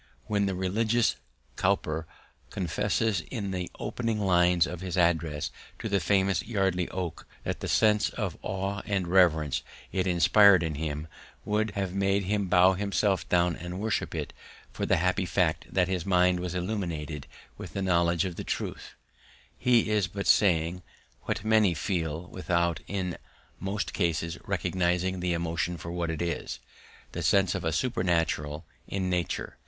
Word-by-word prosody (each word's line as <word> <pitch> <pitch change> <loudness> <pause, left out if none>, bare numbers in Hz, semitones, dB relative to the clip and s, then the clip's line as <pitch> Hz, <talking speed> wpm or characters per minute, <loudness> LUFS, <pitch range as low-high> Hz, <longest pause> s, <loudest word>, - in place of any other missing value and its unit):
When 100 -1 +1
the 95 - -1
religious 110 +5 +1 0.4
Cowper 80 +1 0 0.4
confesses 100 +2 0
in 100 -4 -3
the 90 -1 -3
opening 115 -3 -2
lines 90 -3 +4
of 90 0 -6
his 95 0 -3
address 80 -4 +1 0.3
to 115 - -4
the 100 -2 +2
famous 95 0 +2
Yardley 95 -5 0
oak, 90 -4 -5 0.2
that - - -3
the - - -4
sense 105 -1 +3
of - - -3
awe 95 +1 -3
and 100 -4 0
reverence 80 -8 +3 0.3
it 95 0 0
inspired 95 +1 +6
in 80 -2 -1
him 75 0 -4 0.4
would 105 +1 +1
have 95 -2 -2
made 100 0 +1
him 100 +1 0
bow 90 +1 +5
himself 100 0 0
down 90 -1 +3
and 90 +2 -6
worship 110 +1 -1
it - - -4 0.4
but - - -26
for - - -1
the - - +3
happy 90 +3 +1
fact 90 -5 0
that 90 -2 +2
his 90 -3 -1
mind 90 -1 +3
was 90 0 -4
illumined 85 -6 -3 0.3
with - - -8
the 100 - -2
knowledge 85 -1 +2
of 90 -3 -5
the - - -4
truth, - - -4 0.6
he 120 -3 +3
is 105 -3 +2
but 100 0 -5
saying 90 -3 +3 0.4
what 100 - -2
many 110 -5 +4
feel 80 -2 -2
without 85 -1 0
in 95 -3 -3 0.4
most 100 +2 -3
cases 85 -2 -1
recognizing 90 0 0
the 90 -1 0
emotion 85 +1 -1
for 85 +2 -7
what 85 -1 -2
it 80 +1 -2
is 85 -6 -3 0.5
the 85 - -4
sense 95 +3 +3
of 95 - -2
the 80 -1 -1
supernatural 80 - 0 0.2
in 95 -1 -2
nature. 90 -1 -2
90 Hz, 160 wpm, -28 LUFS, 85-100 Hz, 0.6 s, inspired